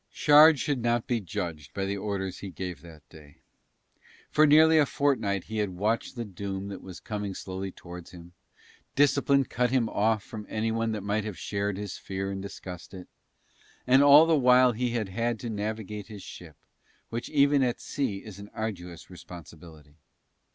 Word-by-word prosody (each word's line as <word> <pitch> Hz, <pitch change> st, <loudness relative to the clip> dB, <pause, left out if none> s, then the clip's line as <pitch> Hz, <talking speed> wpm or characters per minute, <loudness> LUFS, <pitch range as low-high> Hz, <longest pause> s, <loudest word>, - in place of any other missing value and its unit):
Shard 150 Hz, +1 st, +6 dB
should 135 Hz, -2 st, -1 dB
not 120 Hz, 0 st, +1 dB
be 120 Hz, -2 st, 0 dB
judged 80 Hz, -5 st, -6 dB
by 95 Hz, -, -1 dB
the 100 Hz, +1 st, -2 dB
orders 100 Hz, -2 st, -4 dB
he 100 Hz, -, -7 dB
gave 90 Hz, -4 st, -6 dB
that 80 Hz, -2 st, -15 dB
day, 75 Hz, -3 st, -16 dB, 0.9 s
for 155 Hz, 0 st, +5 dB
nearly 160 Hz, +2 st, +6 dB
a 150 Hz, -, +5 dB
fortnight 115 Hz, -, 0 dB
he 110 Hz, 0 st, -5 dB
had 105 Hz, -2 st, 0 dB
watched 110 Hz, +6 st, -1 dB
the 120 Hz, -1 st, -4 dB
doom 100 Hz, 0 st, -5 dB
that 100 Hz, -, -7 dB
was 95 Hz, -2 st, -10 dB
coming 105 Hz, -3 st, -5 dB
slowly 95 Hz, 0 st, -5 dB
towards 90 Hz, -1 st, -11 dB
him, 85 Hz, 0 st, -13 dB, 0.6 s
discipline 140 Hz, 0 st, +3 dB
cut 125 Hz, 0 st, 0 dB
him 125 Hz, -2 st, +2 dB
off 110 Hz, 0 st, +1 dB
from 105 Hz, -2 st, -9 dB
anyone 115 Hz, +1 st, -1 dB
that 105 Hz, -3 st, -4 dB
might 105 Hz, +1 st, -1 dB
have 105 Hz, -3 st, -6 dB
shared 100 Hz, -1 st, -2 dB
his 100 Hz, -2 st, -6 dB
fear 95 Hz, 0 st, -4 dB
and 95 Hz, 0 st, -5 dB
discussed 95 Hz, -2 st, -9 dB
it, 90 Hz, -1 st, -10 dB, 0.8 s
and 130 Hz, +2 st, +5 dB
all 145 Hz, +2 st, +8 dB
the 165 Hz, -1 st, +3 dB
while 125 Hz, -2 st, +5 dB
he 120 Hz, +2 st, -1 dB
had 115 Hz, -4 st, -2 dB
had 115 Hz, +3 st, -1 dB
to 120 Hz, -, -4 dB
navigate 105 Hz, -1 st, -4 dB
his 105 Hz, -3 st, -10 dB
ship, 80 Hz, -4 st, -11 dB, 0.5 s
which 115 Hz, +1 st, -5 dB
even 140 Hz, -1 st, +4 dB
at 125 Hz, -2 st, 0 dB
sea 120 Hz, -9 st, -3 dB
is 105 Hz, -3 st, -10 dB
an 100 Hz, 0 st, -10 dB
arduous 90 Hz, -6 st, -5 dB
responsibility. 80 Hz, -4 st, -13 dB
105 Hz, 180 wpm, -27 LUFS, 95-120 Hz, 0.9 s, all